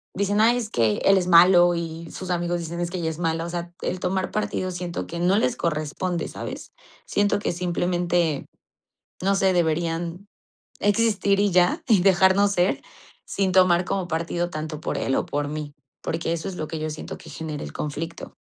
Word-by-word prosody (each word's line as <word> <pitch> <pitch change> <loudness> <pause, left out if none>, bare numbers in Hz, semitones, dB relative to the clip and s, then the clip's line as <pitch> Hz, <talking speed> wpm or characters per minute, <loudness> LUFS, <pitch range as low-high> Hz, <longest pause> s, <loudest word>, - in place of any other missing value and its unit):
dicen: 200 +2 +1
"Ay, 235 +2 +5
es 230 -3 -3
que 110 - +2
él 195 - +6
es 180 -1 0
malo", 175 0 +7
y 165 -1 -5
sus 185 - -7
amigos 175 0 0
dicen: 170 0 -5
"Es 175 0 -2
que 185 - -3
ella 165 -1 -1
es 160 - -9
mala". 165 -1 -1
O - - -5
sea, 175 0 -5
el 185 - -2
tomar 185 +1 -1
partido 200 -3 -2
siento 175 -1 -4
que 170 - -6
no 180 +3 +3
les 235 +2 +1
corresponde, 165 +2 -2
¿sabes? - - -7 0.3
Siento 205 0 +1
que - - -1
simplemente, 175 -3 0 0.8
no 195 +1 +3
sé, 195 -1 +3
deberían 170 +2 -1 0.5
existir 205 -2 +2
y 205 0 +3
ya, 180 0 +3
y 215 -6 +5
dejarnos 190 +1 +4
ser, 180 -1 +1 0.5
sin 195 -1 0
tomar 180 -1 +5
como 185 -1 -2
partido 170 +1 -1
tanto 155 -2 -5
por - - -3
él 135 - 0
o - - 0
por 145 0 -2
mí, 150 -1 -5 0.3
porque 165 0 -2
eso 170 +2 -3
es 190 - -6
lo 155 - -3
que 160 - -4
yo 155 - -2
siento 155 - -7
que - - -13
genera 155 -2 -5
el - - -8
conflicto. 160 +3 -5
175 Hz, 195 wpm, -24 LUFS, 165-190 Hz, 0.8 s, malo